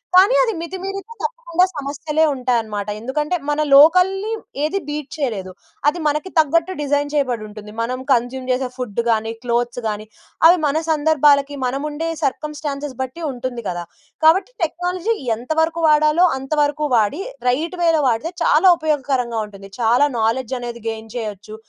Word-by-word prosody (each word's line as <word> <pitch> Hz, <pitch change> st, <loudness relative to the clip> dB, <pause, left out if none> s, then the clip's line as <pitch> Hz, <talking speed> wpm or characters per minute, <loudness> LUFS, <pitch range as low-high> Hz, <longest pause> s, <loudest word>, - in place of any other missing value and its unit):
కానీ, 395 Hz, +7 st, +7 dB
అది 455 Hz, -, 0 dB
మితిమీరితే 385 Hz, +4 st, -6 dB
తప్పకుండా 445 Hz, -7 st, +1 dB
సమస్యలే 295 Hz, +2 st, -1 dB
ఉంటాయన్నమాట. 225 Hz, -5 st, -1 dB
ఎందుకంటే 295 Hz, +8 st, -2 dB
మనం 300 Hz, +1 st, +1 dB
లోకల్‌ని 365 Hz, +8 st, +5 dB, 0.3 s
ఏది 350 Hz, +6 st, 0 dB
బీట్ 295 Hz, -1 st, -4 dB
చేయలేదు. 215 Hz, -10 st, -3 dB, 0.4 s
అది 335 Hz, +4 st, +2 dB
మనకి 300 Hz, +5 st, -1 dB
తగ్గట్టు 330 Hz, +4 st, +2 dB
డిజైన్ 290 Hz, 0 st, 0 dB
చేయబడి 255 Hz, -7 st, 0 dB
ఉంటుంది. 210 Hz, 0 st, -10 dB
మనం 250 Hz, +3 st, -2 dB
కన్జ్యూమ్ 255 Hz, +1 st, 0 dB
చేసే 255 Hz, 0 st, 0 dB
ఫుడ్ 235 Hz, -4 st, -4 dB
గాని, 225 Hz, 0 st, +1 dB
క్లోత్స్ 240 Hz, 0 st, -1 dB
గాని 210 Hz, 0 st, -4 dB, 0.4 s
అవి 355 Hz, +2 st, +6 dB
మన 290 Hz, +1 st, +1 dB
సందర్భాలకి 290 Hz, -2 st, +3 dB
మనం 270 Hz, +3 st, -2 dB
ఉండే 320 Hz, +3 st, -3 dB
సర్కమ్‌స్టాన్సెస్ 290 Hz, -1 st, -3 dB
బట్టి 260 Hz, +6 st, -5 dB
ఉంటుంది 245 Hz, -1 st, -5 dB
కదా! 175 Hz, -1 st, -4 dB, 0.4 s
కాబట్టి 370 Hz, +8 st, +4 dB
టెక్నాలజీ 360 Hz, +5 st, -1 dB, 0.2 s
ఎంతవరకు 320 Hz, +7 st, -1 dB
వాడాలో 305 Hz, +3 st, +4 dB
అంత 270 Hz, +2 st, -10 dB
వరకు 295 Hz, +1 st, 0 dB
వాడి 225 Hz, -, +1 dB, 0.3 s
రైట్‌వేలో 330 Hz, +3 st, +1 dB
వాడితే 240 Hz, +10 st, -1 dB
చాలా 325 Hz, +5 st, +4 dB
ఉపయోగకరంగా 270 Hz, -7 st, -1 dB
ఉంటుంది. 195 Hz, -1 st, -13 dB
చాలా 240 Hz, +5 st, +4 dB
నౌలెడ్జ్ 235 Hz, +3 st, 0 dB
అనేది 235 Hz, -1 st, -6 dB
గెయిన్ 225 Hz, 0 st, -7 dB
చేయొచ్చు. 215 Hz, -2 st, -6 dB
285 Hz, 140 wpm, -20 LUFS, 240-320 Hz, 0.4 s, కానీ